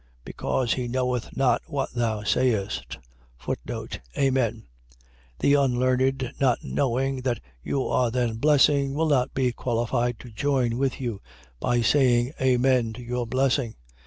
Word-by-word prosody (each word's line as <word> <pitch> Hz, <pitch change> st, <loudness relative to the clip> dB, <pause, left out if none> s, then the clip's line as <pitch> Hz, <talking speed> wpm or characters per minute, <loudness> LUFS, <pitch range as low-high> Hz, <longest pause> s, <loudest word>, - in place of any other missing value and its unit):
Because 125 Hz, -3 st, -1 dB
he 125 Hz, -1 st, -3 dB
knoweth 125 Hz, -1 st, -2 dB
not 135 Hz, -2 st, +3 dB
what 145 Hz, -4 st, -2 dB
thou 115 Hz, -3 st, -1 dB
sayest. 110 Hz, -3 st, 0 dB, 1.2 s
Amen.. 130 Hz, -5 st, +1 dB, 0.7 s
.The 140 Hz, -, +3 dB
unlearned, 130 Hz, -1 st, +2 dB
not 130 Hz, -3 st, +2 dB
knowing 135 Hz, 0 st, -1 dB
that 125 Hz, -3 st, -1 dB, 0.2 s
you 135 Hz, -2 st, -1 dB
are 125 Hz, -2 st, +1 dB
then 120 Hz, -2 st, -1 dB
blessing, 140 Hz, 0 st, +3 dB
will 160 Hz, +1 st, +1 dB
not 135 Hz, -2 st, +1 dB
be 130 Hz, -2 st, +2 dB
qualified 120 Hz, 0 st, -1 dB
to 125 Hz, -, -11 dB
join 125 Hz, -1 st, 0 dB
with 135 Hz, -1 st, 0 dB
you 115 Hz, -6 st, -4 dB, 0.4 s
by 120 Hz, -1 st, +1 dB
saying 125 Hz, 0 st, +3 dB
Amen 125 Hz, -2 st, +2 dB
to 125 Hz, -, -9 dB
your 120 Hz, 0 st, -3 dB
blessing. 130 Hz, -1 st, 0 dB
125 Hz, 130 wpm, -25 LUFS, 120-135 Hz, 1.2 s, not